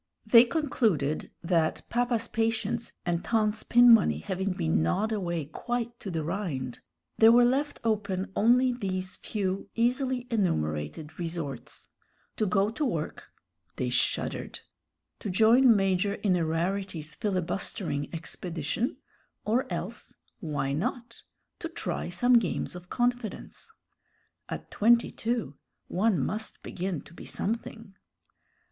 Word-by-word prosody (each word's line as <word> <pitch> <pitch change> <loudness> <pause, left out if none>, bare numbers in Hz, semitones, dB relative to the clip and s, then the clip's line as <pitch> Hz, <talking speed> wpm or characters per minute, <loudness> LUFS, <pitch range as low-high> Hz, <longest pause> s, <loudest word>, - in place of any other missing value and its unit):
They 230 +2 +8
concluded 225 - 0
that, 165 -2 +1
papa's 240 -1 +1
patience 225 0 -1
and 175 -1 0
tante's 215 -2 +1
pin 240 0 +7
money 225 - +4
having 190 -1 -2
been 80 - +1
gnawed 200 - +1
away 175 -7 -2
quite 240 - -4
to 195 - -6
the 165 -3 -2
rind, 150 - -3 0.4
there 225 0 +8
were 240 +1 +7
left 275 +4 0
open 200 -4 -1
only 250 +3 +4
these 185 -5 -3
few 195 -2 -3
easily 250 +1 +1
enumerated 150 - -1
resorts: 165 -7 -5 0.5
to 215 - +1
go 195 +2 +2
to 300 - -3
work 165 - -3 0.4
they 125 - -1
shuddered; - - -1 0.6
to - - -4
join 230 +5 +6
Major 195 +1 +1
Innerarity's 170 -2 0
filibustering 180 -5 -2
expedition; 170 - -3 0.5
or 230 0 +1
else 180 +6 -5 0.2
why 145 -7 -2
not? 235 - -3 0.4
to 330 - -4
try 185 - -3
some 245 +7 +4
games 185 -3 -3
of 180 0 -10
confidence. 245 - -2 0.8
At - - -6
twenty 235 +2 +4
two 225 - -2 0.3
one 205 +1 +2
must 210 +11 -3
begin 180 -3 -3
to - - -16
be - - -10
something. 225 -1 -4
200 Hz, 120 wpm, -28 LUFS, 170-235 Hz, 0.8 s, They